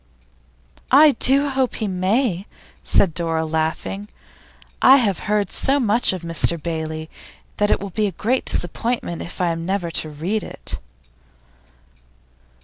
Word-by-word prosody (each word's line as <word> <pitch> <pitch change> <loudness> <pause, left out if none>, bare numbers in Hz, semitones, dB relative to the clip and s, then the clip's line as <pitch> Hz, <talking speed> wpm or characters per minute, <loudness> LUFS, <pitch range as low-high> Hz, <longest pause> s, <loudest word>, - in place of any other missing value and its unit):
'I 295 +3 +7
do 280 +2 +4
hope 265 -2 -1
he 220 - -3
may!' 190 +1 0 0.4
said 185 -5 +2
Dora, 165 -1 -1
laughing. 160 +6 -3 0.7
'I 265 +1 +8
have 210 -8 0
heard 210 -3 +1
so 275 +2 +2
much 230 -1 +3
of 185 -2 -5
"Mr 170 0 +3
Bailey," 160 -1 -4 0.5
that 205 0 +1
it - - +2
will 200 0 -7
be 215 +3 0
a - - -3
great 235 +9 -1
disappointment 175 0 -2
if 170 - -8
I 180 -1 +1
am 165 0 -3
never 180 -1 -2
to 155 - -1
read 170 +9 -3
it. - - -7
190 Hz, 140 wpm, -21 LUFS, 165-230 Hz, 0.7 s, I